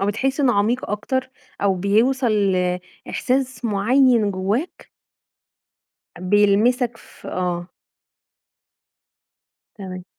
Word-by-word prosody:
أو 195 - 0
بتحس 265 +7 -1
إنّه 265 -3 +3
عميق 220 +5 0
أكتر 255 +5 -2 0.3
أو 195 -1 +3
بيوصل 225 +8 +1
ل 185 -3 +1 0.3
إحساس 260 0 -1
معيّن 230 +1 +3
جوّاك؟ 200 - -3 1.3
بيلمسك 210 +6 +2
ف - - -16
آه. 175 -1 -3 2.1
تمام. 185 -3 -8
210 Hz, 90 wpm, -21 LUFS, 195-255 Hz, 2.1 s, إنّه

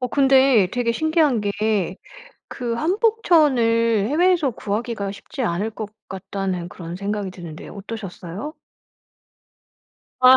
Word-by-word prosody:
어 250 - 0
근데 265 -7 +5
되게 240 -1 +1
신기한 315 -4 +2
게 205 -2 0 0.5
그 240 -2 -3
한복 425 - +1
천을 230 - +3
해외에서 330 -2 +3
구하기가 215 -1 -3
쉽지 205 +6 -7
않을 205 -1 0
것 215 -1 -6 0.2
같다는 190 -2 -4
그런 170 -1 -7
생각이 200 0 -3
드는데요. 170 -4 -9
어떠셨어요? 200 - -7 1.7
아. 255 +1 +9
225 Hz, 260 characters per minute, -22 LUFS, 195-270 Hz, 1.7 s, 아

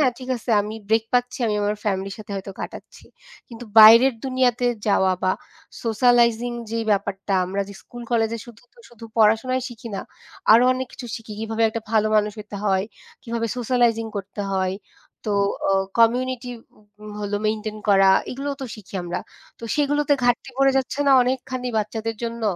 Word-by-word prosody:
হ্যাঁ, 260 -4 +3
ঠিক 255 0 -9
আছে 235 - -6
আমি 210 +1 -6
ব্রেক 220 0 +2
পাচ্ছি, 245 0 +1
আমি 210 - 0
আমার 210 +1 0
ফ্যামিলি 195 -1 -1
র - - -6
সাথে 215 0 -11
হয়তো 195 0 -6
কাটাচ্ছি। - - -9 0.4
কিন্তু 240 0 -10
বাইরের 230 +4 +9
দুনিয়াতে 255 -2 +1 0.2
যাওয়া 190 -2 +3
বা 185 - +3 0.5
সোশ্যালাইজিং 240 +1 +3 0.2
যে 230 - -2
ব্যাপারটা, 195 0 -1
আমরা 195 +2 -2
যে 200 - -10
স্কুল 240 -1 -10
কলেজ 225 -1 +2
এ - - -9
শুধু, 235 -2 -14 0.3
শুধু 230 -1 -13
পড়াশোনাই 225 +4 +3
শিখি 235 -1 -10
না। - - -3 0.5
আরও 235 +3 +7
অনেক 260 0 -3
কিছু 245 - -8
শিখি। 225 -1 -10
কীভাবে 225 0 -2
একটা 230 - -4
ভালো 215 -1 +3
মানুষ 210 0 +1
হইতে 210 -1 -8
হয়, 190 -1 +2 0.4
কীভাবে 230 -1 -2
সোশ্যালাইজিং 235 -2 +1
করতে 200 +1 -6
হয়, 190 0 0 0.5
তো 210 - -1 0.4
অ - - +3 0.3
কমিউনিটি 250 +2 +2 0.5
উম 215 - -9
হলো 205 0 -2
মেইনটেইন 215 0 -2
করা, 195 -1 +6 0.2
এগুলোও 280 +2 -4
তো - - -4
শিখি 200 -2 -14
আমরা। 175 0 -3 0.4
তো 230 - -9
সেগুলোতে 290 0 +1
ঘাটতি 245 +2 +1
পড়ে 270 0 +4
যাচ্ছে 265 +1 -3
না - - +6
অনেকখানি 255 0 -3
বাচ্চাদের 220 +1 -3
জন্য? 230 0 -5
225 Hz, 175 wpm, -22 LUFS, 210-245 Hz, 0.5 s, বাইরের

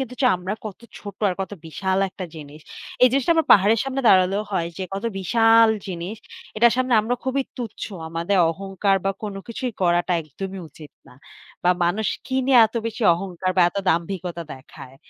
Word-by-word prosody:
কিন্তু 250 -1 -5 0.2
আমরা 185 +3 -4
কত 210 0 -7 0.2
ছোট 200 -2 -9
আর 180 - -1
কত 195 - -4
বিশাল 190 +4 -2
একটা 190 0 -8
জিনিস। 150 0 -11 0.4
এই 255 - +9
জিনিসটা 275 +5 +2
আমার 325 - +2
পাহাড়ের 210 +3 +5
সামনে 270 0 -2
দাঁড়ালেও 190 +2 +4
হয় 170 -3 -1
যে 190 - -3
কত 200 +4 -5
বিশাল 225 +3 +5 0.2
জিনিস 185 +3 -5 0.4
এটার 235 +2 +5
সামনে 255 -1 +1
আমরা 235 +3 -1
খুবই 265 +1 0
তুচ্ছ। 235 -4 -6 0.2
আমাদের 170 +4 -1
অহংকার 195 +2 -1
বা 195 - +2
কোনো 205 -2 -5
কিছুই 245 +1 -4
করাটা 175 +1 +2
একদমই 190 +6 -7
উচিত 150 -1 -14 0.2
না। - - -16 0.5
বা 180 - +5
মানুষ 200 +5 0 0.2
কি 260 - -4
নিয়ে 265 -2 +6
এত 220 - -21
বেশি 230 +1 -5
অহংকার 185 0 -3
বা 185 - +6
এত 175 - -12
দাম্ভিকতা 170 0 -2
দেখায়? 130 0 -13
195 Hz, 180 wpm, -22 LUFS, 175-225 Hz, 0.5 s, এই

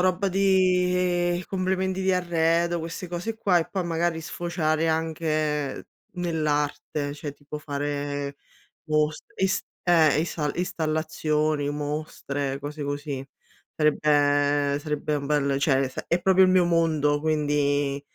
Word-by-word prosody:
roba 185 +2 +2
di 180 -2 +2
complementi 190 0 -1
di 190 0 +2
arredo, 170 -1 +1
queste 165 +2 -6
cose 180 +6 -3
qua 190 -5 +3
e 165 - -1
poi 190 -3 -2
magari 165 0 0
sfociare 160 -1 -1
anche 155 -3 -1 0.3
nell'arte, 150 -3 -1
cioè, 145 -1 -6
tipo 145 +1 -9
fare 145 -1 -3 0.5
mostr 155 0 -1
is 190 0 +2 0.2
eh, 160 -4 +4
isa 155 -3 -2
installazioni, 155 -3 0
mostre, 145 -2 -3
cose 145 +1 -6
così. 145 -1 -4 0.5
Sarebbe 145 -1 +2
sarebbe 150 0 -2
un 140 - -3
bel 140 -1 +1
cioè, 135 -2 +2
s 130 - -6
è 175 +1 +1
proprio 190 0 +5
il - - +3
mio 185 -1 +5
mondo, 160 -4 +2
quindi 145 -2 +1
155 Hz, 120 wpm, -25 LUFS, 145-175 Hz, 0.5 s, proprio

